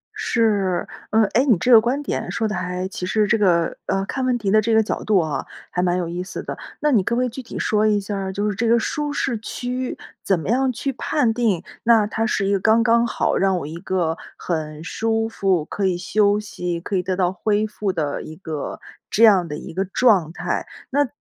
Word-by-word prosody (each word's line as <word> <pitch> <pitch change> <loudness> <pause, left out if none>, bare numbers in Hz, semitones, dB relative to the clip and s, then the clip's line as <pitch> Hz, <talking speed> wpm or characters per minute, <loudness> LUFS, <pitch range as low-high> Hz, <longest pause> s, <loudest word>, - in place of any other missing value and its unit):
是， 205 -6 +1 0.2
嗯， 220 0 +4
诶， 250 +4 +4
你 235 -9 +4
这 245 +8 +1
个 225 -2 +9
观 255 +5 0
点 - - -3
说 220 - 0
得 210 - -3
还 180 +1 -3
其 190 -2 -5
实 215 +1 +2
这 220 - +2
个 175 -5 +2
呃， 195 0 0
看 265 - -3
问 250 -1 +2
题 200 -4 -1
的 215 0 +5
这 225 +1 0
个 220 - +5
角 - - -3
度 210 -3 +3
啊， 155 -3 -1 0.3
还 180 - 0
蛮 180 0 +1
有 175 -2 -2
意 175 +1 -4
思 185 - -7
的。 - - -5 0.3
那 300 -1 +2
你 220 -6 +4
可 235 - 0
不 - - +1
可 255 - +2
以 - - -2
具 260 +3 -7
体 235 - -8
说 215 0 +2
一 210 -1 +3
下 200 +1 -4
儿， 190 -1 -3
就 205 +2 -1
是 200 - -3
这 230 +2 0
个 235 +1 +5
舒 295 +5 -2
适 265 -4 -1
区 250 +3 -4 0.3
怎 190 -3 +1
么 165 - -5
样 260 +2 +2
去 270 +3 -3
判 250 -3 0
定， 215 -7 0 0.2
那 225 -2 +5
它 225 +1 -1
是 195 - 0
一 200 - +2
个 195 - +2
刚 225 +3 +4
刚 235 0 +3
好 - - 0
让 190 -1 +2
我 145 - -4
一 155 +2 -7
个 175 -3 -1 0.2
很 155 -2 -4
舒 225 +4 -1
服、 190 -7 0
可 195 +2 -1
以 180 -2 0
休 205 +2 +2
息、 180 -5 -4
可 195 +3 -4
以 180 - +2
得 185 +1 -2
到 180 0 +1
恢 210 +2 0
复 210 -2 -2
的 150 -5 -2
一 155 - -9
个 155 -5 -5 0.3
这 225 - +2
样 190 -6 +6
的 150 0 -5
一 - - -9
个 190 - 0
状 195 -5 +3
态？ - - -3 0.2
那 285 0 +2
205 Hz, 260 characters per minute, -22 LUFS, 180-230 Hz, 0.3 s, 个